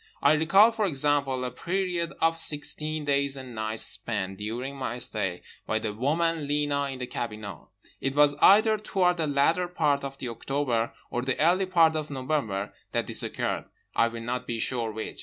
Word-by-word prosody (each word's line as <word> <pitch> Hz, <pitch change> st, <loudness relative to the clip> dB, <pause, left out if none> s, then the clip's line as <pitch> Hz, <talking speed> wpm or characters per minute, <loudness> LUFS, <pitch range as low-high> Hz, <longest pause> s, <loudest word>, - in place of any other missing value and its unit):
I -, -, +6 dB
recall, 170 Hz, +9 st, +5 dB
for 220 Hz, -3 st, 0 dB
example, 140 Hz, -4 st, 0 dB
a 125 Hz, -, -3 dB
period 175 Hz, +3 st, -2 dB
of 165 Hz, 0 st, +2 dB
sixteen 155 Hz, 0 st, 0 dB
days 140 Hz, -1 st, +1 dB
and 130 Hz, -2 st, -8 dB
nights 110 Hz, 0 st, -1 dB
spent 95 Hz, -4 st, -2 dB
(during 120 Hz, +6 st, -4 dB
my 130 Hz, -3 st, -4 dB
stay) 100 Hz, -6 st, -1 dB, 0.2 s
by 110 Hz, -, +1 dB
the 110 Hz, -1 st, -3 dB
woman 155 Hz, +6 st, 0 dB
Lena 145 Hz, -1 st, 0 dB
in 135 Hz, -1 st, -5 dB
the 125 Hz, -, -4 dB
cabinot. 105 Hz, -7 st, -6 dB, 0.3 s
It 135 Hz, 0 st, -2 dB
was 145 Hz, 0 st, +5 dB
either 215 Hz, +2 st, +6 dB
toward 180 Hz, -4 st, +1 dB
the 160 Hz, -2 st, 0 dB
latter 150 Hz, +5 st, +2 dB
part 150 Hz, -5 st, +1 dB
of 135 Hz, 0 st, -6 dB
October 120 Hz, -1 st, -2 dB, 0.2 s
or 120 Hz, -, -1 dB
the 130 Hz, 0 st, -2 dB
early 180 Hz, +5 st, +3 dB
part 165 Hz, -3 st, +4 dB
of 155 Hz, -1 st, -3 dB
November 130 Hz, -8 st, -2 dB, 0.2 s
that -, -, 0 dB
this -, -, +3 dB
occurred, -, -, -2 dB, 0.3 s
I 115 Hz, -, +4 dB
will 115 Hz, 0 st, -6 dB
not 125 Hz, +1 st, -3 dB
be 115 Hz, -, -2 dB
sure 115 Hz, -1 st, -1 dB
which. 110 Hz, 0 st, -6 dB
140 Hz, 180 wpm, -27 LUFS, 120-160 Hz, 0.3 s, I